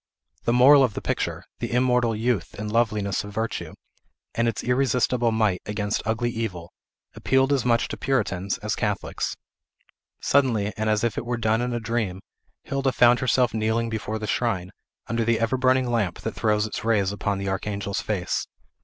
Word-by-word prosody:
The - - +2
moral 135 +3 +7
of 115 -6 0
the - - -2
picture, - - -2 0.2
the - - -3
immortal 125 -2 +2
youth 110 -4 -1
and 105 +1 -4
loveliness 105 -4 +1
of 105 - -8
virtue, 110 +2 -3 0.6
and 115 0 +1
its 115 - -2
irresistibles 125 -1 +2
might 105 -5 +1
against 105 0 -1
ugly 120 +2 0
Evil, 95 -8 -4 0.4
appealed 135 +1 +2
as 135 -3 0
much 115 -1 +2
to - - -5
Puritans 100 -8 -1
as 105 +2 -1
Catholics. 105 -3 -2 0.8
Suddenly, 115 -7 +2
and 110 0 -1
as 105 0 +1
if 120 - 0
it - - -7
were 120 0 -1
done 110 0 +1
in 125 0 -1
a 120 - -1
dream, 115 -5 -2 0.4
Hilda 135 -1 0
found 120 0 +5
herself 125 -2 +2
kneeling 110 +1 0
before 110 -1 -3
the 110 - -5
shrine, 100 -4 -1 0.3
under 115 0 -1
the 115 0 +2
ever 115 +2 +1
burning 130 0 +3
lamp 110 -8 -1
that - - -3
throws 105 -1 +1
its 110 - -5
rays 105 -4 +2
upon 100 0 -2
the 100 0 -4
Archangel's 100 +1 -2
face. 100 -5 -2
115 Hz, 180 wpm, -25 LUFS, 105-120 Hz, 0.8 s, moral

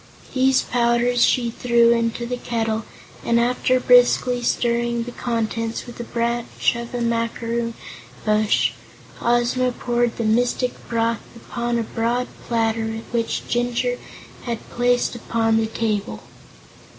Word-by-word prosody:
These 265 0 +3
powders 240 0 +2
she 240 -2 +2
threw 235 0 +3
into 230 0 0
the 250 +1 -2
kettle 225 -2 -2 0.4
and 235 0 +2
after 250 +1 +2
briskly 245 0 +4
stirring 235 0 0
the 245 - -7
contents 230 -1 -2
with 240 -2 -11
a - - -3
branch 235 0 0
from 235 0 -5
a 240 - -2
macaroon 230 0 -1 0.5
bush, 215 0 +3 0.5
Ozma 240 +1 +2
poured 240 -1 -1
the 230 - -1
mystic 245 +3 +1 0.2
broth 230 0 0
upon 235 +1 -3
a 230 - 0
broad 235 +3 -1 0.2
platter 225 -1 0
which 230 -1 -1
Jinjur 245 +1 0 0.5
had 235 -2 -4
placed 245 0 +1
upon 225 -1 0
the 225 0 +1
table. 210 - -2
235 Hz, 125 wpm, -22 LUFS, 230-245 Hz, 0.5 s, briskly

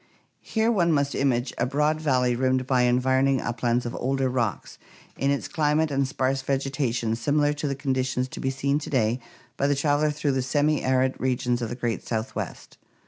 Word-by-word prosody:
Here 225 +1 0
one 175 -6 +2
must 140 -2 +1
image 130 -2 0
a 120 - +1
broad 150 +3 +1
valley 125 -5 +2
rimmed 130 +1 +1
by 130 -1 +2
environ 130 +2 +2
ing 135 -1 +2
uplands 120 +1 -1
of 120 - -4
older 135 0 0
rocks, 120 -5 -2 0.4
in 135 - 0
its 140 -1 0
climate 155 0 +1
and 135 -1 +1
sparse 135 0 -1
vegetation 130 -4 -1
similar 145 +5 +1
to 145 0 -3
the 140 - -1
conditions 130 -2 -1
to - - -8
be 135 - -1
seen 140 +2 0
to 150 - -7
day 120 -2 +1 0.4
by 140 - +1
the 145 - +2
traveler 145 +2 +2
through 150 -1 -1
the 130 -1 0
semiarid 130 -2 +1
regions 125 -1 0
of 115 - -2
the 120 - -4
great 120 -2 -2
Southwest. 115 +2 -5
135 Hz, 190 wpm, -25 LUFS, 125-145 Hz, 0.4 s, one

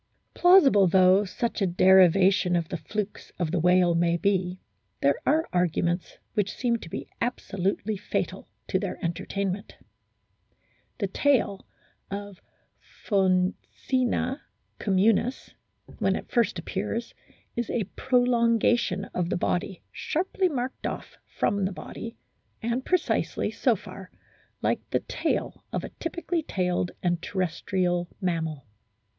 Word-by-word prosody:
Plausible 290 - +6
though 185 +3 +5
such 215 +5 -3
a 195 - +3
derivation 185 +1 +5
of 170 -2 -1
the 175 - -3
flukes 205 +6 -5
of 170 -3 -1
the 180 - +1
whale 180 +1 +4
may 170 0 +2
be, 185 -1 0 0.4
there 140 0 +4
are 315 +3 +3
arguments 175 0 0 0.2
which 205 -2 0
seem 240 -2 +1
to 170 - -10
be - - -5
absolutely 205 -3 -1
fatal 205 - -3 0.2
to 190 - +2
their 195 -2 -3
entertainment. 195 +3 -3 1.2
The - - -1
tail 250 -9 +1 0.4
(of 200 -1 -6 0.6
Phoccena 210 +7 0 0.4
communis), 215 +5 +1 0.5
when - - +2
it - - -7
first 235 -7 +2
appears, 205 +7 -3 0.4
is 235 0 -2
a 230 - 0
prolongation 235 -5 +2
of 175 -1 -1
the 195 - 0
body 180 +1 -2
sharply 370 +3 0
marked 260 -3 -3
off - - -7 0.2
from 200 -1 +1
the 190 - -1
body, 225 +4 -8 0.4
and 235 +3 -1
precisely, 365 +3 0
so - - +2
far, - - -10 0.5
like - - +2
the - - 0
tail - - -2
of - - -2
a - - -5
typically 335 +1 -3
tailed 180 - -1
and 175 -2 +1
terrestrial 180 -1 -1
mammal. 160 -7 -2
195 Hz, 125 wpm, -27 LUFS, 180-235 Hz, 1.2 s, Plausible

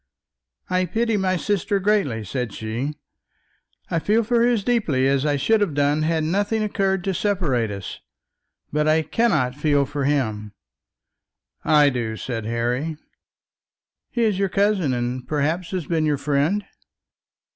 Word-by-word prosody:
"I 185 0 +1
pity 225 +5 0
my 190 -2 +1
sister 200 +2 0
greatly," 190 - +1
said 125 -1 -3
she. 120 +7 -4 1.0
"I 165 - +1
feel 215 +7 +2
for 235 +2 +1
her 235 - +4
as 230 -5 +1
deeply 170 - +1
as 140 +2 +1
I 145 - +2
should 220 +10 +2
have 175 -8 0
done 145 +1 +2
had 160 0 +1
nothing 205 +6 0
occurred 195 -3 0
to 195 - -1
separate 170 - 0
us; 100 -2 -6 0.7
but 150 0 +1
I 160 +1 +3
cannot 155 - +1
feel 145 0 +2
for 140 0 -3
him." 110 -8 -1 1.1
"I 150 -2 +5
do," 115 -3 -3
said 115 -3 -4
Harry. 120 +7 -1 1.1
"He 235 - -1
is 210 -4 +1
your 195 -1 +1
cousin, 195 -6 +1
and 125 0 -3
perhaps 155 +5 -1
has 185 -4 -3
been 160 -1 0
your 150 -1 +1
friend?" 150 +9 0
155 Hz, 150 wpm, -22 LUFS, 130-195 Hz, 1.1 s, I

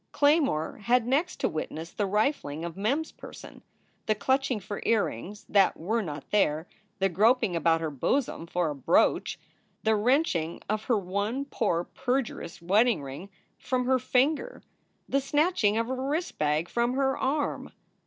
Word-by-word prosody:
Claymore 285 - +2
had 245 -1 +3
next 290 +8 +1
to - - +3
witness 160 +1 -5
the 205 - -1
rifling 195 - 0
of 170 - -6
Mem 220 +10 +1
s 320 - -9
person, - - -12 0.5
the 215 - +3
clutching 260 +2 +1
for 200 +1 -6
earrings 205 - -1
that 195 -2 +3
were 220 +8 -1
not 150 -7 -7
there, 160 -5 +2 0.3
the 195 -1 +2
groping 205 +1 +3
about 165 0 +2
her 160 -2 -2
bosom 170 - -1
for 175 -2 0
a - - -5
brooch, 135 - +2 0.4
the 220 0 +3
wrenching 210 - +1
of 215 +1 -2
her 235 - +2
one 205 +8 -2
poor 190 -11 0
perjurous 245 -8 -3
wedding 210 0 +3
ring 140 +8 -8 0.3
from 255 -1 -1
her 260 0 +3
finger, 295 - 0 0.4
the 275 - +1
snatching 275 - +2
of 230 - +1
her 260 +2 -3
wrist 320 +4 -2
bag 150 +2 +1
from 235 +4 0
her 270 0 +1
arm. 285 +2 -1
215 Hz, 160 wpm, -28 LUFS, 170-265 Hz, 0.5 s, had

